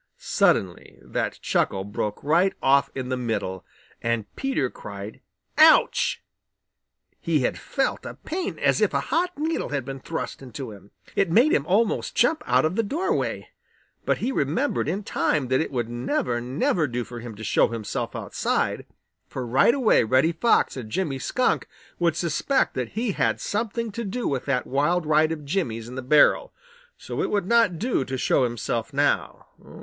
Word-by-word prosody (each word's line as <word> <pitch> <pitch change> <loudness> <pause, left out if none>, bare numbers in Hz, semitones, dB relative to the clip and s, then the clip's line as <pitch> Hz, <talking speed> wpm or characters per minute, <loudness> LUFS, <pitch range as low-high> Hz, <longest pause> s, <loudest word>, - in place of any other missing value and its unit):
Suddenly 90 -8 0
that - - -3
chuckle 95 -1 0
broke 105 +1 -4
right 170 +6 +3
off 140 +1 +3
in 130 -1 -4
the 130 - -1
middle, 110 -6 -3 0.4
and 115 -2 -1
Peter 270 - 0
cried 100 -2 -9 0.4
"Ouch!" - - +5 1.0
He 160 -4 +1
had 125 - 0
felt 270 - -1
a - - -7
pain 355 +3 -4
as - - +2
if - - +2
a - - +3
hot 355 +2 +2
needle 320 +2 -1
had 140 -4 -2
been 135 0 -6
thrust 160 +1 -5
into 130 -2 -7
him. 100 -1 -14 0.3
It 195 - +2
made 240 - +4
him 140 - +1
almost 205 +4 +1
jump 300 +7 +3
out 125 +3 +3
of 160 +4 0
the 230 - +2
doorway. 335 - -2 0.5
But - - +1
he 250 - -2
remembered 210 - 0
in 190 +6 -2
time 145 -8 0
that 130 +2 +2
it - - -2
would 120 -4 -2
never, 120 0 -1
never 140 +6 0
do 120 -1 -3
for 120 0 -9
him 115 -2 -8
to 110 - -9
show - - +3
himself 115 -3 -4
outside, - - -1 0.4
for 130 - -5
right 135 - +4
away 250 - +4
Reddy 130 +8 +3
Fox 200 +8 +2
and 120 -5 -7
Jimmy 140 -1 -2
Skunk 255 - 0 0.3
would 170 -2 +2
suspect 175 - 0
that 125 -3 -4
he 225 +2 -1
had - - -1
had - - +1
something 225 +1 -2
to 235 +4 -4
do 230 +4 -3
with 135 -2 -2
that 135 -3 0
wild 160 +6 +1
ride 155 +1 +3
of 155 -2 -5
Jimmy's 125 - -2
in 125 - -9
the 130 - -4
barrel. 150 - +4 0.5
So - - -5
it - - -1
would 205 -3 0
not 225 -5 +3
do 230 - 0
to 130 0 -4
show 130 +1 +2
himself 120 -2 -3
now. - - 0
145 Hz, 180 wpm, -24 LUFS, 125-205 Hz, 1.0 s, Ouch